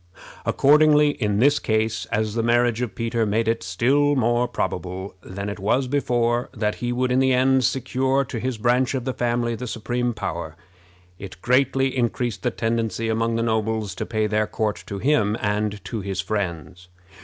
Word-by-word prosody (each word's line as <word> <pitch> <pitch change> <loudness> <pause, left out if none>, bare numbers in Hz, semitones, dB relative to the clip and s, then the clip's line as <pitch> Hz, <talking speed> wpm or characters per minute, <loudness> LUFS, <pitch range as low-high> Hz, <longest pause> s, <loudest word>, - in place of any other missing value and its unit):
Accordingly, 150 +1 +5
in 105 -7 -1
this 145 +6 +4
case, 110 0 -1
as 110 0 -1
the 115 - 0
marriage 120 0 +2
of 120 -5 -3
Peter 115 0 -1
made 110 +1 0
it 115 0 +1
still 130 +11 +2
more 120 -1 +2
probable 95 0 -4
than 100 +2 -6
it 100 0 -5
was 125 +7 +1
before 120 -3 0
that 105 -1 0
he 120 0 -1
would 125 +1 0
in 125 - +3
the 130 0 +3
end 130 +1 +3
secure 135 +2 +1
to 120 - -5
his 125 0 -3
branch 125 +4 +1
of 125 -2 -3
the 130 - -1
family 120 -1 0
the 125 +2 -5
supreme 120 +2 -2
power, 85 -5 -4 0.6
it 95 -2 -9
greatly 135 +1 +2
increased 120 -4 -1
the - - +1
tendency 115 0 -2
among 115 +1 0
the 115 - 0
nobles 110 -3 -1
to - - -5
pay 110 -2 0
their 105 0 0
court 105 -5 -2
to 100 - -5
him 110 -3 +1
and 105 -1 -2
to 110 - -4
his 95 -1 -4
friends. 90 -3 -4
115 Hz, 180 wpm, -23 LUFS, 105-125 Hz, 0.6 s, Accordingly